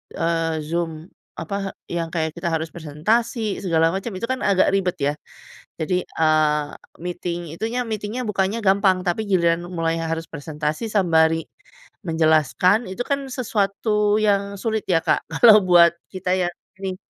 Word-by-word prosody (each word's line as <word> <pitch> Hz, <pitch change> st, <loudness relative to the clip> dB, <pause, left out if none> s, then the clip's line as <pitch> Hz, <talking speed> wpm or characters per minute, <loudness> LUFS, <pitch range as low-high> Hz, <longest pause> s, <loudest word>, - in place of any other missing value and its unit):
eee, 165 Hz, -1 st, 0 dB
Zoom, 165 Hz, +1 st, -3 dB, 0.3 s
apa, 200 Hz, -1 st, -4 dB, 0.2 s
yang 170 Hz, -1 st, -2 dB
kayak 160 Hz, -2 st, -1 dB
kita 170 Hz, 0 st, -2 dB
harus 160 Hz, 0 st, -1 dB
presentasi 210 Hz, -, -1 dB
segala 165 Hz, -2 st, +3 dB
macam, 195 Hz, +5 st, -3 dB
itu 185 Hz, -, -3 dB
kan 260 Hz, 0 st, -1 dB
agak 195 Hz, -2 st, +3 dB
ribet 190 Hz, -2 st, +1 dB
ya. 140 Hz, +1 st, +1 dB, 0.7 s
Jadi, 180 Hz, +3 st, 0 dB
eee, 155 Hz, -2 st, +2 dB, 0.4 s
meeting 175 Hz, -1 st, -4 dB
itunya, 230 Hz, +8 st, -2 dB
meeting-nya 215 Hz, +2 st, -4 dB
bukanya 200 Hz, +2 st, 0 dB
gampang, 190 Hz, -1 st, +3 dB
tapi 195 Hz, +5 st, 0 dB
giliran 170 Hz, -2 st, +2 dB
mulai 165 Hz, -1 st, -1 dB
harus 165 Hz, 0 st, -3 dB
presentasi 150 Hz, +4 st, -4 dB
sembari 165 Hz, -5 st, +3 dB, 0.6 s
menjelaskan, 160 Hz, -, +2 dB
itu 190 Hz, -, -9 dB
kan 280 Hz, -1 st, 0 dB
sesuatu 210 Hz, -3 st, 0 dB
yang 200 Hz, -1 st, +1 dB
sulit 220 Hz, -1 st, -1 dB
ya, 165 Hz, -2 st, +4 dB
Kak. -, -, +1 dB
Kalau 215 Hz, +4 st, +7 dB
buat 170 Hz, -2 st, +6 dB, 0.2 s
kita 185 Hz, -1 st, -1 dB
ya, 180 Hz, -2 st, +1 dB, 0.3 s
ini, 190 Hz, -1 st, -3 dB
180 Hz, 145 wpm, -22 LUFS, 165-205 Hz, 0.7 s, Kalau